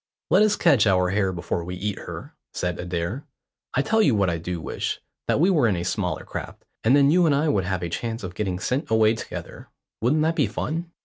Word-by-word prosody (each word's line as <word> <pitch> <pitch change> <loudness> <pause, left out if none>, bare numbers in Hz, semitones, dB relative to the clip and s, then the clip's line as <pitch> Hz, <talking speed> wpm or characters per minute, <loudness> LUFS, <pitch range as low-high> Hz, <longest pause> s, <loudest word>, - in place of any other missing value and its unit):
"Let 185 +5 +6
us 210 -1 +4
catch 115 -7 +4
our 90 -2 +3
hare 95 -1 +1
before 85 -1 -3
we 90 +2 -5
eat 100 +2 -3
her," - - -8 0.2
said 90 0 -2
Adair. 90 - -3 0.5
"I 135 - +3
tell 220 +9 +2
you 140 - +4
what 100 -3 +2
I 85 - -2
do 85 +1 -4
wish; - - -3 0.3
that - - +2
we 180 +5 +4
were 150 -10 +3
in 105 - +1
a 85 - -3
smaller 90 - -2
craft, - - -7 0.2
and 120 +5 +5
then 140 0 +5
you 175 0 +4
and 145 - +3
I 150 +2 +1
would 95 -8 +1
have 90 -1 -2
a 85 - -2
chance 115 +6 -4
of 90 -1 -5
getting 95 -1 -2
sent 125 - -2
away 110 0 +4
together. 110 - -8 0.3
Wouldn't 145 +7 +2
that 165 +1 +1
be - - +2
fun?" 165 +2 -4
110 Hz, 235 wpm, -24 LUFS, 90-145 Hz, 0.5 s, Let